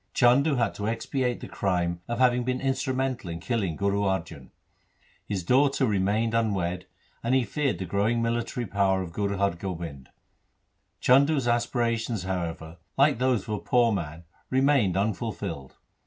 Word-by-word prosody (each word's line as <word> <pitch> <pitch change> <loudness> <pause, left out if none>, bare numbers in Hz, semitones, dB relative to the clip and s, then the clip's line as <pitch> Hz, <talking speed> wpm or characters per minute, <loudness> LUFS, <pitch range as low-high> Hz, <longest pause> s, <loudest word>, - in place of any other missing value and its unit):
Chandu 140 +4 +4
had 120 -2 +1
to 105 - -4
expiate 120 +2 -1
the - - -6
crime 85 -3 -1
of 120 - -2
having 125 -1 +3
been 125 +1 -1
instrumental 130 -4 -1
in 85 0 -5
killing 100 -5 -1
Guru 100 +2 0
Arjan; 85 -8 -2 0.8
his 95 -3 -2
daughter 135 +6 +3
re 105 -5 +1
mained 110 +4 +1
unwedded, 95 -6 0 0.4
and 120 +3 +1
he 130 - +3
feared 145 +2 -1
the 95 - -4
growing 100 +6 +1
military 120 +1 -1
power 95 -1 +1
of 85 -2 -9
Guru 100 +1 -1
Har 100 0 +2
Gobind. 85 -7 -6 0.9
Chandu's 140 +1 +4
aspirations, 120 -3 0
however, 85 -3 -4 0.2
like 140 -2 +4
those 125 -5 +2
of - - -13
a 105 -1 -1
poor 120 -2 +3
man 85 -5 -4 0.3
remained 130 -7 +3
unful 100 -2 -1
filled. 70 -1 -6
110 Hz, 155 wpm, -27 LUFS, 95-125 Hz, 0.9 s, Chandu